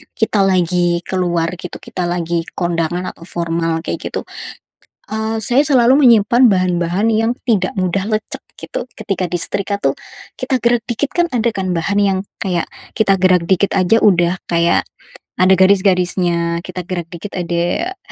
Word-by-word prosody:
kita 220 -1 0
lagi 175 -2 +1
keluar, 175 -3 -1
gitu, 180 - -7
kita 180 -2 -4
lagi 170 -1 -2
kondangan 175 +1 -2
atau 170 - -15
formal 165 -1 -2
kayak - - -4
gitu, - - -4 0.9
eee, 220 +1 -2
saya 245 +7 +2
selalu 265 0 +4
menyimpan 235 +2 +5
bahan-bahan 185 +2 +1
yang 225 +2 +1 0.2
tidak 190 -5 +2
mudah 190 +1 0
lecek, 215 -1 -3 0.2
gitu, - - -5
ketika 195 -4 -3
disetrika, 200 +3 -2
tuh, - - 0 0.4
kita 260 -2 -1
gerak 240 -2 +1
dikit, 250 +4 -2
kan, 345 - +3
ada, 235 -1 +1
kan, 185 -2 -1
bahan 175 +4 -1
yang 195 -2 +2 0.2
kayak 180 -3 -1 0.2
kita 200 -3 +2
gerak 185 -2 +3
dikit 195 +1 +2
aja 190 +4 +3
udah 175 -2 +3
kayak 170 0 +2 0.6
ada 185 +1 +6
garis-garisnya, 180 -3 +2
kita 180 -2 -6
gerak 175 -3 -4
dikit 175 +4 -8
ada 175 - -1
185 Hz, 150 wpm, -17 LUFS, 175-215 Hz, 0.9 s, ada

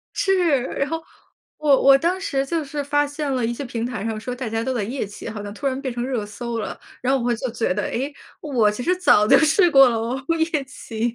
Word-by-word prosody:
是， 355 -9 +2 0.2
然 275 - 0
后 325 +2 -3 0.5
我 290 -3 +3
我 275 0 +7
当 345 +5 0
时 275 -8 -1
就 315 +2 -2
是 285 +1 -4
发 290 +1 +1
现 290 0 -3
了 250 -2 0
一 230 - 0
些 280 - -5
平 235 -2 -4
台 245 -5 -5
上 225 -1 -2
说 245 +3 -5
大 250 -1 -5
家 225 +1 -2
都 260 +2 -2
在 235 - -1
夜 240 +3 -3
骑， 205 - -9
好 210 -1 -6
像 205 0 -7
突 280 - -5
然 265 0 -1
变 265 -3 -3
成 240 0 -3
热 250 -5 -2
搜 230 +3 -5
了。 220 - -5 0.2
然 255 +1 +1
后 270 -2 +1
我 240 0 +1
就 245 +2 -4
觉 225 -4 -1
得， 205 +3 -2
哎， 270 +5 -3 0.3
我 245 -8 +2
其 210 +4 -5
实 360 +7 +2
早 295 - +4
就 - - +7
试 325 +3 +4
过 270 -3 +8
了 235 - 0
哦， 235 +4 -2 0.3
夜 295 -4 0
骑。 230 -3 -4
260 Hz, 275 characters per minute, -22 LUFS, 230-290 Hz, 0.5 s, 过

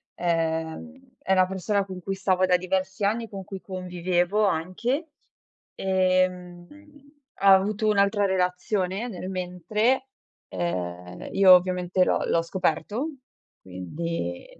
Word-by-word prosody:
Ehm, 165 +10 -2
è 190 - 0
la 185 -1 +5
persona 195 +2 -1
con 185 -1 -8
cui 195 +2 -3
stavo 185 -1 +2
da 180 -1 +4
diversi 190 +2 -2
anni, 225 +2 -1
con 195 -2 -8
cui 190 0 -8
convivevo 180 +2 0
anche. 200 - -1 0.7
Ehm, 185 -2 0 0.7
ha 195 -1 +8
avuto 210 +3 +2
un'altra 200 0 +3
relazione 190 +2 -1
nel 185 -4 -6
mentre. 200 +8 0 0.4
Ehm, 90 0 -4
io 190 -2 +7
ovviamente 180 0 +3
l'ho - - +1
l'ho 165 - +2
scoperto. 190 - -1 0.5
Quindi 95 - -5
185 Hz, 115 wpm, -25 LUFS, 175-200 Hz, 0.7 s, ha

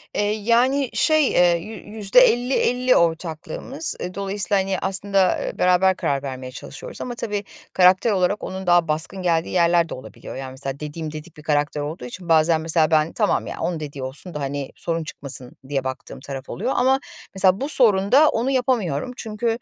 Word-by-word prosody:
Eee, 205 0 +1
yani, 240 +5 +2
şey, 310 -3 +3
eee, 175 -1 +4
yü 215 +6 -8 0.2
yüzde 205 +4 +4
elli 250 +1 +3
elli 250 +1 +2
ortaklığımız. 170 - -1
E, 180 +1 -5
dolayısıyla, 200 0 0
hani, 190 -1 -2
aslında, 195 -1 +1
eee, - - -5
beraber 180 +1 +4
karar 140 -4 -1
vermeye 130 -1 -6
çalışıyoruz - - -9
ama, 245 -1 -4
tabii, 205 -3 -3 0.3
karakter 185 +4 +5
olarak 195 +1 +1
onun 190 -1 -6
daha 175 -1 +4
baskın 160 +5 -2
geldiği 165 -2 +1
yerler 170 -1 +3
de - - -5
olabiliyor. 130 - -10
Yani, 130 0 -6
mesela, 135 +1 -6
dediğim 150 +1 -5
dedik 155 +1 -10
bir 150 - -12
karakter 150 -1 0
olduğu 145 -3 -5
için 170 +7 -9
bazen, 160 0 +4
mesela, 160 -1 +2
ben, 155 +1 +2
"Tamam 210 -3 0
ya, - - -6
onun 170 -3 -2
dediği 145 -3 -6
olsun 145 +7 -6
da, 150 - -4
hani, 140 -1 -4
sorun 165 -1 -3
çıkmasın." 135 -4 -7
diye 135 -2 -1
baktığım 130 0 -6
taraf 135 0 -8
oluyor. 235 +9 -2
Ama, 265 +2 +3 0.4
mesela, 190 +3 +3
bu 285 - -2
sorunda 250 +2 +4
onu 245 +4 0
yapamıyorum. 250 - 0
Çünkü, 225 +1 -4
180 Hz, 185 wpm, -22 LUFS, 155-215 Hz, 0.4 s, karakter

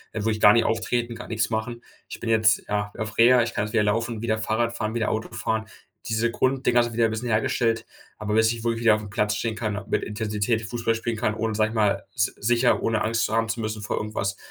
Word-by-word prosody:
wo 110 +1 -1
ich 110 - -3
gar 105 - +9
nicht 115 - +3
auftreten 115 +1 -1
kann, - - -9
nix 110 -2 0
machen. 120 +2 -3 0.3
Ich - - -7
bin 115 - -4
jetzt, 110 -2 +3
ja, 105 0 -2
auf 110 -1 -5
Reha, 120 +1 +6
ich 120 - -4
kann 105 - -1
jetzt 105 - -8
wieder 110 -2 +3
laufen 115 +3 0
und 110 - -7
wieder 110 -1 0
Fahrrad 115 +2 -1
fahren, 110 0 -3
wieder 115 -2 0
Auto 110 +1 -3
fahren. 110 0 -2 0.4
Diese 115 +1 +1
Grund-Dinger 125 -2 +2
sind 120 -1 -4
wieder 115 0 +2
'n 110 - 0
bisschen 115 +3 -4
hergestellt, 115 +1 +1 0.3
aber 105 -1 -3
bis 110 0 +4
ich 115 -1 -5
wohl 115 -1 0
wieder 115 -2 +5
auf'm 105 -1 -6
Platz 105 -1 0
stehen 110 0 -2
kann, 105 -3 -3
mit - - +1
Intensität 105 +1 -1
Fußball 115 +1 -1
spielen 115 0 -3
kann, 110 -1 0
ohne, 110 0 -2
sage 110 0 +1
ich 115 - -8
mal, 105 -3 +1
s 105 -2 +1
sicher 120 +3 +2
ohne 110 -1 0
Angst 115 +1 +1
zu - - -2
haben 115 0 +1
zu 115 - -2
müssen 110 -1 -3
vor - - -2
irgendwas, 100 -2 -3
110 Hz, 250 wpm, -24 LUFS, 110-115 Hz, 0.4 s, gar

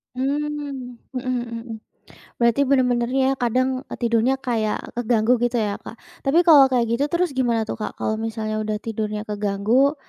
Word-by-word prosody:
Mmm, 280 -2 -3 0.2
mhm - - 0
mhm 240 -2 -3
mhm. 230 -2 -7 0.7
Berarti 235 +3 +3
benar-benarnya 250 -1 +2
ya, - - +2
kadang 255 +2 +1 0.3
tidurnya 235 +2 +2
kayak 225 -5 0 0.2
keganggu 235 -1 +2
gitu 240 0 +1
ya 205 -1 -1
Kak. - - -10 0.3
Tapi 280 +5 +4
kalau 290 -5 +9
kayak 245 -2 +2
gitu 235 +5 +1
terus 340 +4 0
gimana 235 -3 +2
tuh - - -3
Kak, - - -3
kalau 215 - 0
misalnya 215 -1 -3
udah 215 0 -2
tidurnya 215 -1 -3
keganggu, 210 +7 +2
240 Hz, 160 wpm, -22 LUFS, 220-265 Hz, 0.7 s, kalau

